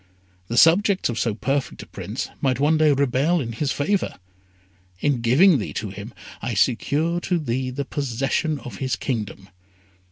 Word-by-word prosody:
The 120 Hz, -, -3 dB
subjects 185 Hz, -, +4 dB
of 120 Hz, -1 st, -2 dB
so 115 Hz, -3 st, 0 dB
perfect 135 Hz, +4 st, -2 dB
a -, -, -13 dB
prince -, -, -6 dB
might 130 Hz, -2 st, +1 dB
one 150 Hz, +3 st, +3 dB
day 155 Hz, -1 st, +4 dB
rebel 140 Hz, +5 st, +2 dB
in 120 Hz, -6 st, -3 dB
his 135 Hz, +5 st, -2 dB
favour. 185 Hz, +7 st, -1 dB, 0.8 s
In 140 Hz, -1 st, 0 dB
giving 140 Hz, +8 st, +5 dB
thee 105 Hz, -, -5 dB
to 105 Hz, -3 st, -4 dB
him 100 Hz, +4 st, -8 dB, 0.3 s
I 120 Hz, -, -3 dB
secure 145 Hz, -, +1 dB
to 175 Hz, 0 st, -1 dB
thee 130 Hz, -4 st, -2 dB
the 140 Hz, +2 st, -4 dB
possession 140 Hz, +3 st, -1 dB
of 115 Hz, -6 st, -8 dB
his 130 Hz, +3 st, -1 dB
kingdom. 105 Hz, -6 st, -4 dB
135 Hz, 165 wpm, -23 LUFS, 120-155 Hz, 0.8 s, giving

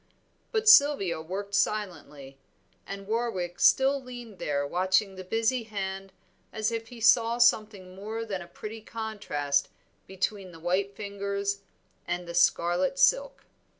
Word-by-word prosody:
But 440 Hz, -1 st, -1 dB
Sylvia 280 Hz, -, +6 dB
worked 195 Hz, +5 st, -6 dB
silently, 175 Hz, -10 st, -2 dB, 0.5 s
and 195 Hz, 0 st, -7 dB
Warwick 195 Hz, -6 st, -2 dB
still 270 Hz, +1 st, +4 dB
leaned 245 Hz, -5 st, -10 dB
there 145 Hz, -1 st, -1 dB
watching 190 Hz, +5 st, +1 dB
the 190 Hz, 0 st, -8 dB
busy 225 Hz, +6 st, 0 dB
hand 195 Hz, -3 st, -5 dB, 0.4 s
as 220 Hz, +1 st, -1 dB
if 225 Hz, 0 st, -4 dB
he 240 Hz, 0 st, -11 dB
saw 230 Hz, +1 st, +4 dB
something 215 Hz, -6 st, +2 dB
more 215 Hz, +4 st, -5 dB
than 195 Hz, -4 st, -4 dB
a 170 Hz, -, -10 dB
pretty 220 Hz, +4 st, -8 dB
contrast 205 Hz, -12 st, -2 dB, 0.4 s
between 190 Hz, 0 st, -3 dB
the 165 Hz, -, -12 dB
white 190 Hz, +4 st, -1 dB
fingers 200 Hz, -1 st, -3 dB, 0.5 s
and 175 Hz, 0 st, -3 dB
the 170 Hz, -, -6 dB
scarlet 175 Hz, +6 st, +2 dB
silk. -, -, +2 dB
200 Hz, 135 wpm, -28 LUFS, 185-225 Hz, 0.5 s, Sylvia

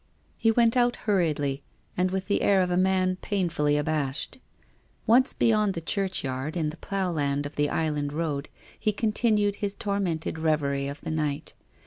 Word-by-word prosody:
He 225 Hz, -, +2 dB
went 230 Hz, +1 st, +3 dB
out 245 Hz, -1 st, +3 dB
hurriedly 150 Hz, -9 st, +1 dB, 0.3 s
and 180 Hz, +1 st, +1 dB
with 190 Hz, 0 st, -2 dB
the 200 Hz, +1 st, 0 dB
air 195 Hz, -2 st, +4 dB
of 180 Hz, -1 st, 0 dB
a -, -, +2 dB
man 185 Hz, 0 st, +2 dB
painfully 170 Hz, -8 st, 0 dB
abashed. 150 Hz, -, -1 dB, 0.7 s
Once 250 Hz, +4 st, +5 dB
beyond 215 Hz, -3 st, +2 dB
the -, -, -2 dB
churchyard, 160 Hz, -5 st, -2 dB
in 155 Hz, -2 st, 0 dB
the 155 Hz, -, -12 dB
plough 195 Hz, -1 st, -2 dB
land 145 Hz, -2 st, -1 dB
of 145 Hz, -, -7 dB
the 145 Hz, 0 st, +1 dB
island 150 Hz, -3 st, -1 dB
road, 150 Hz, -2 st, -2 dB, 0.3 s
he 215 Hz, -, +1 dB
con 215 Hz, +1 st, 0 dB
tinued 210 Hz, -2 st, +2 dB
his 205 Hz, -1 st, -3 dB
tormented 190 Hz, -6 st, -2 dB
reverie 140 Hz, -3 st, 0 dB
of 140 Hz, +1 st, -7 dB
the -, -, -4 dB
night. 150 Hz, -1 st, -2 dB
175 Hz, 170 wpm, -27 LUFS, 150-200 Hz, 0.7 s, Once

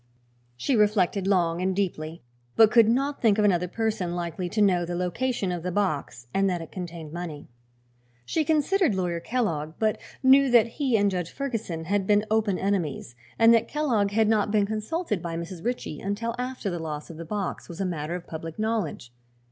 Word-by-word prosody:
She 255 Hz, -, 0 dB
reflected 205 Hz, -3 st, +2 dB
long 175 Hz, -3 st, +2 dB
and 185 Hz, 0 st, 0 dB
deeply, 170 Hz, -4 st, -3 dB, 0.3 s
but 220 Hz, -1 st, +6 dB
could 230 Hz, -2 st, +6 dB
not 275 Hz, +4 st, 0 dB
think 220 Hz, -3 st, +4 dB
of 210 Hz, -, +3 dB
another 180 Hz, -3 st, +2 dB
person 210 Hz, -4 st, -2 dB
likely 175 Hz, +1 st, -3 dB
to 215 Hz, -, -3 dB
know 185 Hz, -4 st, +4 dB
the 175 Hz, +1 st, -3 dB
location 190 Hz, +3 st, -1 dB
of 175 Hz, -1 st, -3 dB
the 180 Hz, +2 st, -3 dB
box 150 Hz, -11 st, -2 dB
and 195 Hz, 0 st, +2 dB
that 180 Hz, -1 st, -1 dB
it 165 Hz, -, -9 dB
contained 170 Hz, -4 st, -7 dB
money. 170 Hz, -4 st, -6 dB, 0.8 s
She 315 Hz, -, 0 dB
considered 315 Hz, -, +2 dB
Lawyer 175 Hz, -2 st, -1 dB
Kellogg, 165 Hz, -9 st, -2 dB
but 215 Hz, -1 st, 0 dB, 0.2 s
knew 270 Hz, +1 st, +6 dB
that 240 Hz, -3 st, +6 dB
he 245 Hz, 0 st, 0 dB
and 200 Hz, -1 st, +2 dB
Judge 180 Hz, -3 st, -2 dB
Ferguson 225 Hz, -, -4 dB
had 195 Hz, +3 st, 0 dB
been 210 Hz, 0 st, +3 dB
open 215 Hz, -4 st, +2 dB
enemies 175 Hz, -11 st, -2 dB, 0.2 s
and 230 Hz, 0 st, +7 dB
that 230 Hz, -, +3 dB
Kellogg 245 Hz, -10 st, +1 dB
had 220 Hz, +1 st, +2 dB
not 215 Hz, -1 st, +2 dB
been 210 Hz, -1 st, +3 dB
consulted 215 Hz, -, -2 dB
by 165 Hz, -1 st, -4 dB
Mrs. 170 Hz, 0 st, -7 dB
Ritchie 240 Hz, -10 st, -3 dB
until 215 Hz, +4 st, -2 dB
after 250 Hz, -5 st, -3 dB
the 175 Hz, -, -3 dB
loss 155 Hz, -1 st, -5 dB
of 160 Hz, -, -11 dB
the 165 Hz, -, -6 dB
box 195 Hz, +3 st, -4 dB
was 170 Hz, +1 st, -8 dB
a 195 Hz, -, 0 dB
matter 165 Hz, -2 st, -3 dB
of 175 Hz, -1 st, -7 dB
public 160 Hz, 0 st, -7 dB
knowledge. 215 Hz, -, -2 dB
195 Hz, 195 wpm, -26 LUFS, 170-225 Hz, 0.8 s, and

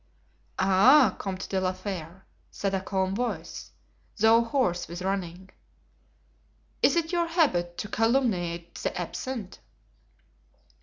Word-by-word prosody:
"Ah 195 Hz, +6 st, +5 dB
Comte 190 Hz, -2 st, -4 dB
de 190 Hz, -1 st, -1 dB
la 185 Hz, 0 st, 0 dB
Fere," 185 Hz, -2 st, -7 dB, 0.2 s
said 195 Hz, -1 st, -3 dB
a 190 Hz, -, 0 dB
calm 190 Hz, 0 st, -1 dB
voice, 245 Hz, +4 st, -4 dB, 0.5 s
though 225 Hz, +2 st, +5 dB
hoarse 230 Hz, -8 st, 0 dB
with 175 Hz, +2 st, -7 dB
running, 190 Hz, -1 st, -4 dB, 1.3 s
"is -, -, +4 dB
it 330 Hz, -1 st, 0 dB
your 345 Hz, -1 st, +1 dB
habit 180 Hz, -, +1 dB
to -, -, -4 dB
calumniate 200 Hz, -8 st, 0 dB
the -, -, -3 dB
absent?" 205 Hz, +4 st, -5 dB
195 Hz, 115 wpm, -27 LUFS, 180-235 Hz, 1.3 s, Ah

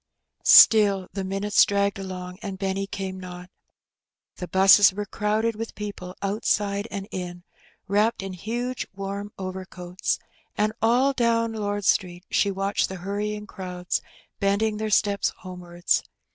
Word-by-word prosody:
Still 200 Hz, -4 st, +7 dB
the 195 Hz, -, -3 dB
minutes 195 Hz, +2 st, +3 dB
dragged 200 Hz, -1 st, 0 dB
along, 185 Hz, -1 st, -7 dB
and 195 Hz, -3 st, -5 dB
Benny 195 Hz, 0 st, -2 dB
came 190 Hz, -1 st, -5 dB
not. 180 Hz, 0 st, -9 dB, 0.9 s
The 180 Hz, -, -5 dB
^busses 195 Hz, +2 st, +7 dB
were 205 Hz, +2 st, -4 dB
crowded 215 Hz, +3 st, 0 dB
with 225 Hz, +1 st, -6 dB
people 200 Hz, -3 st, -7 dB
outside 200 Hz, 0 st, 0 dB
and 195 Hz, -1 st, -5 dB
in, 175 Hz, -1 st, -6 dB, 0.4 s
wrapped 205 Hz, +1 st, +1 dB
in 195 Hz, -1 st, -5 dB
huge 240 Hz, +7 st, -4 dB
warm 200 Hz, +1 st, -5 dB
overcoats, 185 Hz, -1 st, -4 dB, 0.4 s
and 215 Hz, +1 st, +1 dB
all 245 Hz, +5 st, +3 dB
down 230 Hz, -2 st, +1 dB
Lord 205 Hz, -2 st, -3 dB
Street 180 Hz, 0 st, +1 dB
she 200 Hz, -, +2 dB
watched 195 Hz, +1 st, -1 dB
the 190 Hz, -, -5 dB
hurrying 210 Hz, +1 st, -3 dB
crowds 180 Hz, -3 st, -4 dB, 0.4 s
bending 205 Hz, +2 st, +1 dB
their 215 Hz, 0 st, -2 dB
steps 200 Hz, -1 st, +2 dB
homewards. 175 Hz, -2 st, -1 dB
200 Hz, 135 wpm, -25 LUFS, 185-210 Hz, 0.9 s, Still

